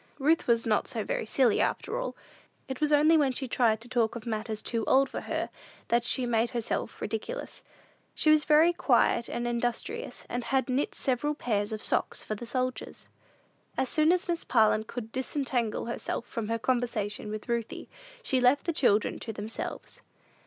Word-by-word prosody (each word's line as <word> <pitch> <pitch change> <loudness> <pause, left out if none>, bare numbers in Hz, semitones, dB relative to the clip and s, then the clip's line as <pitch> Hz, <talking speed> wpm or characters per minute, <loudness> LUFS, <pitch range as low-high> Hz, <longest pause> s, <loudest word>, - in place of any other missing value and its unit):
Ruth 305 +4 +2
was 230 -1 +3
not 215 -2 +1
so 230 -5 -2
very 220 - -2
silly, 245 -2 +3
after 480 +3 -1
all. - - -4 0.5
It 265 +1 -6
was 300 0 +2
only 305 +2 +6
when 285 -3 +3
she 260 +1 -3
tried 230 -3 +2
to 235 - -12
talk 240 -3 +1
of 235 - -7
matters 220 -1 -3
too 230 -2 -1
old 270 +1 +4
for - - -5
her - - -3 0.4
that 235 0 +3
she 250 +1 +1
made 230 -1 +1
herself 235 -1 -3
ridiculous. 225 - -5 0.5
She 310 - +4
was 305 -1 +5
very 315 +3 +5
quiet 235 -7 +2
and 240 0 -2
industrious, 240 - -3
and 245 -1 -3
had 265 0 +1
knit 260 +3 0
several 280 +3 0
pairs 210 -6 -1
of 215 -1 -5
socks - - 0
for - - -4
the 230 +3 -6
soldiers. 255 +1 -3 0.7
As 260 - +1
soon 310 +1 +4
as 365 +1 +1
Miss 340 -1 -1
Parlin 220 -2 +3
could 225 -1 -7
disentangle 255 -3 -1
herself 235 0 -3
from 230 -3 -4
her 230 +1 0
conversation 230 -4 -1
with 215 0 -6
Ruthie, 235 -2 -3 0.4
she 260 - +2
left 250 +3 +4
the 335 - 0
children 215 -8 +2
to 225 - -5
themselves. 215 +1 -6
245 Hz, 180 wpm, -29 LUFS, 225-280 Hz, 0.7 s, only